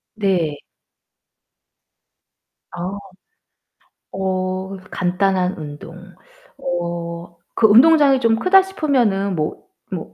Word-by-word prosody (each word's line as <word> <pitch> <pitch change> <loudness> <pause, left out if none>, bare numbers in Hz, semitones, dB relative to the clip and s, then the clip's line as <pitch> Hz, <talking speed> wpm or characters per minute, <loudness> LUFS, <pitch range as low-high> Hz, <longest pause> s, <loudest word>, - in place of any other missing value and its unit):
네. 180 -8 0 2.2
아 180 +3 -5 1.2
어 190 0 -3 0.2
간단한 185 0 0
운동. 155 +3 -9 0.6
어 170 -1 -5 0.2
그 220 - +4
운동장이 275 +4 +6
좀 225 -1 +3
크다 380 +4 +5
싶으면은 240 - 0
뭐 155 -1 -3 0.3
뭐 - - -6
190 Hz, 135 characters per minute, -19 LUFS, 175-225 Hz, 2.2 s, 운동장이